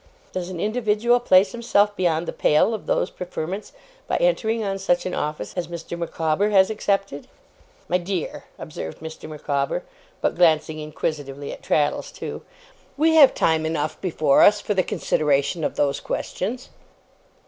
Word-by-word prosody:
Does 185 -1 -4
an 180 -2 -6
individual 220 +3 +2
place 190 -4 +4
himself 210 -3 +2
beyond 170 -2 0
the - - -3
pale 155 +9 +3
of 220 - -6
those - - 0
preferments 180 +2 -5 0.4
by - - 0
entering 230 - +1
on 195 -1 -2
such 175 -2 +1
an 185 - -3
office 150 -8 -3
as 175 -2 -2
Mr. 170 0 -6
Micawber 170 +3 0
has 195 -1 +4
accepted?' 195 -7 -2 0.6
'My 180 - +1
dear,' 180 -2 -4
observed 80 - -7
Mr. 160 0 -9
Micawber 140 -2 -2 0.4
but - - 0
glancing 155 -2 +3
inquisitively 145 -2 -4
at - - -11
Traddles, 150 - 0
too; - - -7 0.6
'we 320 +2 +3
have 295 -4 +7
time 160 -1 +2
enough 155 -1 -2
before 155 -6 +3
us, 210 0 +6
for 210 - -2
the 190 - +3
consideration 150 -2 0
of - - -1
those 140 -1 +1
questions. 245 +7 -4
175 Hz, 155 wpm, -23 LUFS, 155-205 Hz, 0.6 s, have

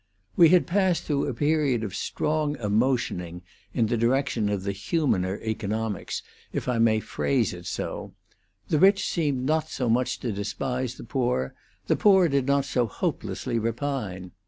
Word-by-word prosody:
We 170 -2 +7
had 180 0 +5
passed 185 -1 +1
through 140 -2 0
a - - -2
period 145 -5 +1
of 100 -4 -4
strong 150 +8 -1
emotioning 105 - -1 0.3
in 115 - +1
the 120 +2 0
direction 120 -2 +1
of 100 -2 -2
the 100 - -1
humaner 100 - 0
economics, 110 -1 -3 0.3
if - - -3
I 125 -2 +1
may 110 -1 +4
phrase 120 -1 0
it 90 0 -9
so; - - -5 0.5
the 155 - +1
rich 195 +3 +5
seemed 145 -7 0
not 155 +2 +1
so 125 -3 -2
much 125 +2 +1
to 120 - -2
despise 125 +5 -3
the - - -10
poor, 120 - -1 0.3
the - - +2
poor 190 -4 +5
did 140 -2 +1
not 140 0 +2
so 125 -3 0
hopelessly 115 +3 -2
repine. 115 -6 -3
125 Hz, 160 wpm, -26 LUFS, 105-145 Hz, 0.5 s, We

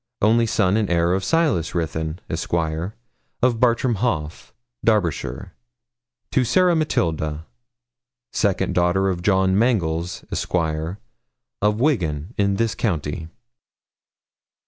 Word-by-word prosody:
only 115 +2 +3
son 100 -2 +2
and 105 -3 0
heir 85 0 +2
of 95 0 0
Silas 145 - +1
Ruthyn, 80 -1 -2
Esq., 80 - -4
of 95 +8 -2
Bartram 120 0 +2
Haugh, 85 -8 -2 0.3
Derbyshire, 90 - 0 0.8
to 130 - +3
Sarah 180 +8 +3
Matilda, 80 - -1 0.9
second 100 -3 +1
daughter 90 +2 +2
of 90 -2 -2
John 95 0 +2
Mangles, 90 -7 0
Esq., - - -2
of 80 - -3
Wiggan, 90 - 0
in 100 -1 +1
this 115 +1 0
county.' 80 -6 -2
95 Hz, 105 wpm, -22 LUFS, 80-115 Hz, 0.9 s, only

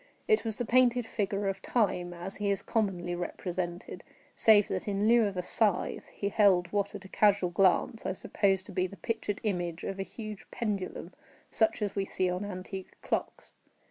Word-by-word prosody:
It 435 -2 +3
was 220 -2 -3
the 245 - -2
painted 245 0 +4
figure 200 -2 -1
of 195 0 -2
Time 185 -7 0
as 175 +3 -6
he 205 -1 -1
is 200 0 0
commonly 185 -6 -1
represented, 175 0 -4 0.3
save 210 -2 +6
that, - - -3
in 205 +1 +1
lieu 230 -1 +5
of 195 -2 -5
a 180 - -1
scythe, 210 +1 +1
he 200 - -3
held 195 -4 +4
what, 205 0 0
at 200 -1 -8
a - - -8
casual 200 -2 +3
glance, 195 +5 +2
I - - -1
supposed 190 0 0
to - - -10
be 185 0 0
the 200 - -12
pictured 210 -3 -3
image 175 -5 -2
of 195 - -4
a - - 0
huge 215 0 -8
pendulum 195 -5 -4 0.4
such 220 -1 +2
as 205 - -2
we 195 -1 0
see 185 -1 0
on 180 +2 -2
antique 190 -1 -7
clocks. - - -3
195 Hz, 190 wpm, -30 LUFS, 185-210 Hz, 0.4 s, save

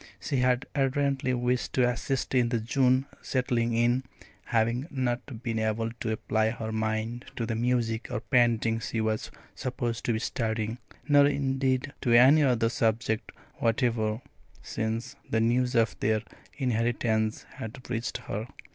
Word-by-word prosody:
She 140 - -2
had 125 0 +2
ardently 135 -1 +1
wished 125 +1 -1
to 125 -2 +3
assist 125 +3 -2
in 125 -2 +3
the 120 -1 0
June 130 +3 +2 0.2
"settling 120 -3 0
in," 120 +3 +2 0.4
having 120 +4 +1
not 125 -2 -3
been 115 -3 -1
able 110 +1 0
to 110 - -2
apply 110 0 +1
her 110 -1 -4
mind 110 +2 -2
to 115 - -2
the 115 - -2
music 115 -1 0
or - - -2
painting 115 -3 +2
she 115 - -3
was 110 0 -1 0.2
supposed 120 -3 -3
to 120 - +2
be - - 0
studying, 110 0 -2 0.3
nor 145 -1 +6
indeed 135 -1 0
to 120 - +2
any 135 +6 +7
other 120 -5 +3
subject 110 -1 0 0.3
whatever, 115 -1 0 0.4
since 115 +2 -3
the 110 - +1
news 125 +2 +2
of 115 -1 +3
their 110 0 +1 0.3
inheritance 115 -3 0
had 120 +4 -8
reached 120 -1 -2
her. 110 +3 -4
120 Hz, 145 wpm, -28 LUFS, 110-130 Hz, 0.4 s, any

